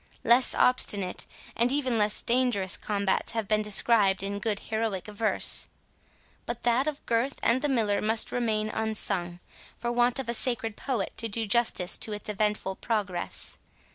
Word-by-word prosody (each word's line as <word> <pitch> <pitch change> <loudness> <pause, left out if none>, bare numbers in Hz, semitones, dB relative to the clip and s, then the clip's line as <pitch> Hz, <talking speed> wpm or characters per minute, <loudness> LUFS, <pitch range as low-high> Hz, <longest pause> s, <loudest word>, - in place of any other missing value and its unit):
Less 245 +2 +5
obstinate, 205 -7 +1 0.3
and 240 +2 +1
even 260 -5 0
less 210 0 +4
dangerous 235 -7 +1
combats, 200 -2 -1
have 225 -3 -3
been 215 0 +1
described 210 -2 +2
in 200 +1 -3
good 205 -1 -1
heroic 220 -4 -3
verse; 210 +1 +2 0.8
but 235 0 -5
that 245 +4 +2
of 300 -2 -5
Gurth 240 +4 -1
and 240 +3 +2
the 295 - 0
Miller 220 -6 +1
must 220 +1 +1
remain 215 -3 -1
unsung, 195 -6 0 0.4
for 240 +1 -3
want 240 0 +2
of 270 - -4
a 235 - -1
sacred 235 -2 0
poet 245 -7 -3
to 230 - 0
do 225 +2 -2
justice 210 -4 +1
to 215 - -1
its 210 - -7
eventful 210 -2 -2
progress. 200 -6 -2
220 Hz, 160 wpm, -27 LUFS, 205-240 Hz, 0.8 s, Less